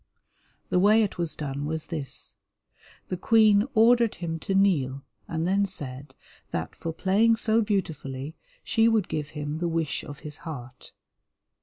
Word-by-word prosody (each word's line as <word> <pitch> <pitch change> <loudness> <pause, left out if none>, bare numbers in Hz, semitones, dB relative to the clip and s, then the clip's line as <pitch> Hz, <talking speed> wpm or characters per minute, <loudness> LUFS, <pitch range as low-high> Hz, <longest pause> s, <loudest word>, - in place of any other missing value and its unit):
The 180 - +3
way 215 +4 +5
it 200 -3 -3
was 170 -2 -2
done 145 -1 -4
was 160 0 -3
this. 150 -6 -4 0.8
The 185 - -2
Queen 215 +2 +4
ordered 230 0 +5
him 165 -2 -4
to 195 - -2
kneel, 140 -9 +2 0.2
and 165 0 -2
then 195 +3 +2
said 145 -8 -6 0.3
that - - -4
for 165 - -4
playing 200 +7 +3
so 225 0 +2
beautifully 155 -8 -3 0.3
she 225 0 +3
would 225 -4 +2
give 150 -1 -3
him 150 +1 -3
the 175 - 0
wish 165 -3 -1
of 145 0 -9
his 150 -1 -6
heart. 130 -5 -9
165 Hz, 155 wpm, -26 LUFS, 150-205 Hz, 0.8 s, way